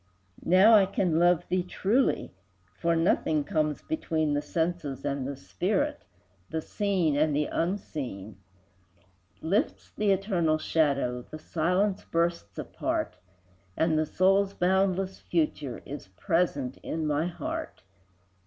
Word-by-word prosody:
Now 190 +6 +7
I 200 -3 +7
can 180 -4 +1
love 175 0 +3
thee 185 0 +1
truly, 200 +8 0 0.4
For 170 0 0
nothing 160 -2 +2
comes 155 -3 -1
between 160 - -1
The 145 - +1
senses 160 -5 -2
and 140 -2 -2
the 140 - -4
spirit, 95 -5 -1 0.4
The 160 - -2
seen 180 -3 0
and 150 0 +2
the 150 +1 +1
unseen; 135 - -3 1.1
Lifts 200 - -1
the 210 -1 +1
eternal 185 -5 +2
shadow, 140 -6 +1
The 155 - -7
silence 180 +6 0
bursts 170 - -1
apart, - - -3 0.6
And 160 -1 +2
the 155 0 +1
soul's 195 +3 +2
boundless 190 +1 +1
future 150 -6 -2
Is 140 -6 -7
present 135 - -1
in 160 0 -4
my 150 +2 +1
heart. 180 - -5
165 Hz, 125 wpm, -28 LUFS, 145-185 Hz, 1.1 s, Now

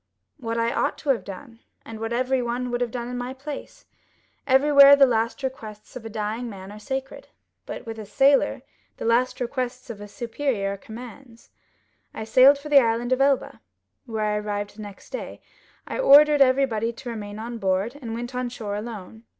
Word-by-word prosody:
"What 230 -1 -3
I 230 0 +1
ought - - 0
to 295 - -6
have 260 -4 +2
done, 215 +4 -10 0.3
and 225 -1 -8
what 225 +1 -4
everyone 250 0 -1
would 240 0 -2
have 245 - 0
done 235 0 -5
in 245 0 -4
my 250 +2 -5
place. 280 +2 -8 0.6
Everywhere 280 +1 +7
the 280 -1 +7
last 230 +2 -1
requests 220 -5 -7
of 250 - -7
a 225 - -7
dying 220 +2 -3
man 195 -2 -9
are 210 - -10
sacred; 265 +3 -5 0.4
but - - -7
with 225 -1 -7
a 215 - -7
sailor 275 +5 +3 0.3
the - - -6
last 250 +2 +2
requests 250 0 -4
of 215 - -9
his 205 0 -10
superior 230 -4 -2
are - - -7
commands. 235 +3 -12 0.6
I 220 - -4
sailed 255 +6 +6
for 285 +2 -10
the 280 -2 +7
Island 235 +1 0
of 255 - 0
Elba, 275 -1 +1 0.5
where 220 -2 -2
I 210 0 0
arrived 205 -1 -4
the - - -8
next 205 -2 -11
day; - - -6 0.5
I - - -4
ordered 295 - +7
everybody 255 -4 +3
to 245 +1 -8
remain 205 -2 -7
on 230 +1 -6
board, 195 +4 0
and 225 -3 -5
went 240 +2 -6
on 250 0 -2
shore 215 -4 -5
alone. 220 0 -8
235 Hz, 190 wpm, -24 LUFS, 220-260 Hz, 0.6 s, Everywhere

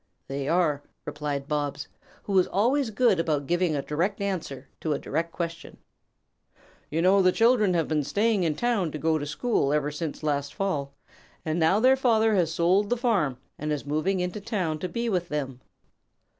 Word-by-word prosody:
"They 135 0 -4
are," 160 -4 +2 0.2
replied 145 -2 -4
Bobs, 145 -1 -2 0.4
who 200 - -4
was 185 -2 +4
always 245 +6 +1
good 220 -4 +2
about 150 -4 0
giving 175 0 +1
a 140 - -2
direct 175 +9 -1
answer 165 -9 -4
to 155 - -1
a - - -1
direct 165 +3 -3
question. 165 -1 -6 1.1
"You 165 +2 -1
know 195 +2 +5
the 185 -1 +4
children 225 -4 +3
have 165 -3 +1
been 155 -2 0
staying 205 +8 +1
in 160 -4 0
town 215 -6 0
to - - -3
go 160 +1 +1
to 145 - -4
school 150 - 0
ever 150 0 0
since 150 0 -5
last 145 -1 -1
fall, 145 -8 -2 0.5
and 160 +1 -1
now 165 +5 +3
their 260 +3 +5
father 225 -4 +3
has 175 -5 +2
sold 180 +5 +2
the 245 - +1
farm 200 - +1 0.2
and 150 +1 -2
is 150 -2 -2
moving 155 +7 0
into 180 +3 -3
town 185 -8 -2
to 180 - -3
be 235 +6 -2
with 180 -5 -1
them." 135 -4 -4
170 Hz, 185 wpm, -26 LUFS, 150-200 Hz, 1.1 s, know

